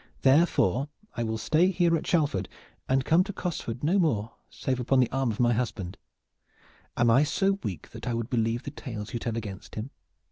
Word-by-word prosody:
Therefore 135 - +3 0.3
I - - -2
will 110 -1 -1
stay 160 +10 +3
here 175 -2 +3
at 160 - -3
Shalford 145 - +1 0.4
and 130 0 +2
come 170 +3 +5
to 200 - -5
Cosford 155 - -4
no 180 +7 +3
more 115 - +1 0.2
save 130 -1 -2
upon 130 +2 +2
the 125 - +3
arm 135 -1 0
of 110 - -4
my 120 -1 +4
husband. 110 -6 -3 1.0
Am 120 -1 +4
I 130 +4 +6
so 195 +6 +1
weak 95 -5 -5
that - - -8
I 120 - 0
would 115 +2 -3
believe 115 -1 0
the 140 - -6
tales 110 -7 -7
you 120 - -1
tell 115 0 -3
against 105 -4 -7
him? 110 +6 -5
125 Hz, 200 wpm, -28 LUFS, 115-155 Hz, 1.0 s, I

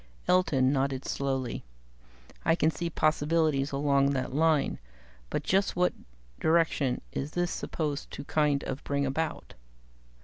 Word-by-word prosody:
Elton 140 -8 +3
nodded 135 -1 -1
slowly. 135 -3 -2 0.8
"I 165 - +4
can 160 -1 +2
see 170 +1 -3
possibilities 155 -2 +1
along 140 0 +2
that 130 -1 -2
line 155 0 +2 0.5
but - - -2
just 195 +1 +1
what 180 0 +2 0.5
direction 160 -5 +2
was 145 +3 -3
this 175 0 0
supposed 150 -3 -3
to - - -7
kind 145 -1 +1
of 135 +2 -5
bring 140 0 0
about?" 155 +4 -3
145 Hz, 130 wpm, -29 LUFS, 135-160 Hz, 0.8 s, I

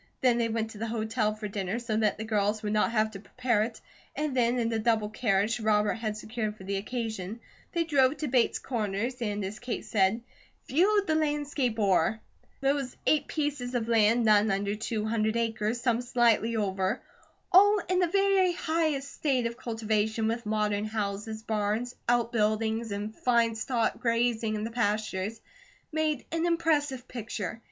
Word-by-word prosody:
Then 245 -3 +3
they 230 -1 +1
went 225 0 -2
to 210 - -11
the 230 - -2
hotel 220 -1 -1
for 215 0 -5
dinner, 195 +1 -3
so 235 -2 -3
that 215 -2 +1
the 220 - -4
girls 210 -1 0
would 210 0 -1
not 215 +2 +2
have 215 -1 +1
to 195 - -8
prepare 235 +1 0
it, 225 +1 -3 0.4
and 300 -2 -2
then 245 0 +2
in 230 -1 0
a 225 - 0
double 220 -2 +1
carriage 215 0 +1
Robert 210 -1 +2
had 215 -2 -3
secured 215 -1 -4
for 190 - -11
the 195 +1 -2
occasion, 220 -1 -4 0.3
they 340 -1 +2
drove 285 -3 +3
to 305 - -3
Bates 245 -2 +2
Corners 230 +1 -3
and 205 -3 -2
as 205 +4 -6
Kate 245 -1 -4
said, 200 +2 +2 0.5
"Viewed 400 +7 +3
the 315 - +1
landscape 290 -6 0
o'er." 200 0 +2 0.4
Those 275 -1 0
eight 295 -2 +3
pieces 285 -5 -2
of 230 -2 -1
land, 230 +1 +4
none 215 0 +5
under 200 +1 0
two 215 0 -3
hundred 220 0 0
acres, 225 0 -1
some 240 -1 +1
slightly 235 -2 +2
over, 195 0 0 0.5
all 410 +3 +7
in 365 0 +2
the 360 - +3
very 390 0 +3
highest 315 -5 -1
state 265 -5 0
of 235 0 -2
cultivation, 220 -1 -1
with 230 0 -2
modern 210 -1 0
houses, 215 0 -3
barns, 220 +3 -1 0.2
outbuildings, 225 -1 +1
and 205 +2 -4
fine 235 -2 +2
stock 230 +1 -1
grazing 230 -2 +1
in 210 - -3
the 225 - -4
pastures, 215 -2 -1 0.5
made 310 -3 0
an 330 +1 0
impressive 295 -6 +1
picture. 220 -3 -5
225 Hz, 175 wpm, -28 LUFS, 215-250 Hz, 0.5 s, all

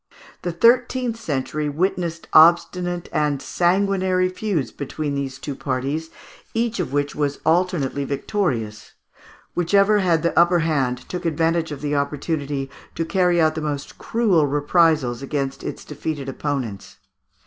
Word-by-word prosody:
The 175 - -2
thirteenth 240 +5 +3
century 150 - -2
witnessed 170 +1 -2
obstinate 175 +2 +4
and 150 -2 +1
sanguinary 185 +1 +1
feuds 185 - -2
between 145 +1 -4
these 135 -1 -3
two 145 - -5
parties, 135 +4 -3 0.5
each 230 -1 0
of 170 -7 -2
which 145 0 0
was 145 -1 -1
alternately 160 -4 +1
victorious. 135 - -2 0.6
Whichever 200 +4 +3
had 170 -5 +2
the 170 - 0
upper 175 0 +5
hand 130 -6 -1
took 180 0 -5
advantage 165 0 0
of 145 - -6
the 150 0 -2
opportunity 140 -1 -2 0.3
to 165 - -1
carry 180 0 +2
out 155 -1 +4
the 160 - -4
most 145 -2 -4
cruel 200 -10 +2
reprisals 145 -3 +2
against 135 -1 -3
its - - -6
defeated 150 -1 -5
opponents. 135 -7 -4
160 Hz, 135 wpm, -22 LUFS, 140-180 Hz, 0.6 s, upper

